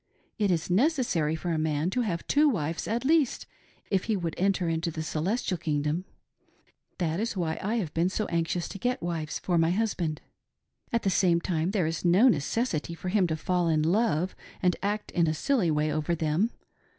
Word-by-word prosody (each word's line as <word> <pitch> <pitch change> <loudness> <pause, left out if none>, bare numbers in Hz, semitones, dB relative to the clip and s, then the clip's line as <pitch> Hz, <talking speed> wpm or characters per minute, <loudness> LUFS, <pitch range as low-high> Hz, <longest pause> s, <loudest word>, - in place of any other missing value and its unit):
It 205 -2 +2
is 175 0 0
necessary 220 - +2
for 170 +2 -3
a 160 - 0
man 155 +2 0
to 250 - 0
have 180 -8 -2
two 295 +1 +4
wives 165 - -2
at 235 +4 -1
least 305 -3 +2 0.5
if 195 -2 +1
he 220 - +1
would 170 -3 -3
enter 190 -1 +1
into 165 +1 0
the 160 -1 -4
celestial 180 +5 -1
kingdom. 150 +2 -1 0.9
That 165 -1 -1
is 220 -2 -2
why 160 -3 -1
I 210 +4 -1
have 180 -10 -2
been 170 +2 +2
so 215 +2 -2
anxious 170 +1 -1
to 195 - -7
get 250 +1 -1
wives 165 -3 -2
for 175 -2 0
my 165 0 +3
husband. 180 -6 -1 0.7
At 235 - 0
the 195 - +2
same 175 -2 +3
time 170 -1 -1
there 195 -4 +1
is 160 0 -2
no 185 +8 +5
necessity 170 - -1
for 185 - -5
him 190 -2 +3
to 160 -1 -2
fall 180 +2 0
in 155 -2 +2
love 180 -1 +1 0.2
and 180 -1 +2
act 205 +1 -2
in 170 -2 +2
a 155 - 0
silly 230 - +1
way 150 0 +1
over 155 +3 0
them. 160 +7 +1
175 Hz, 200 wpm, -28 LUFS, 160-205 Hz, 0.9 s, no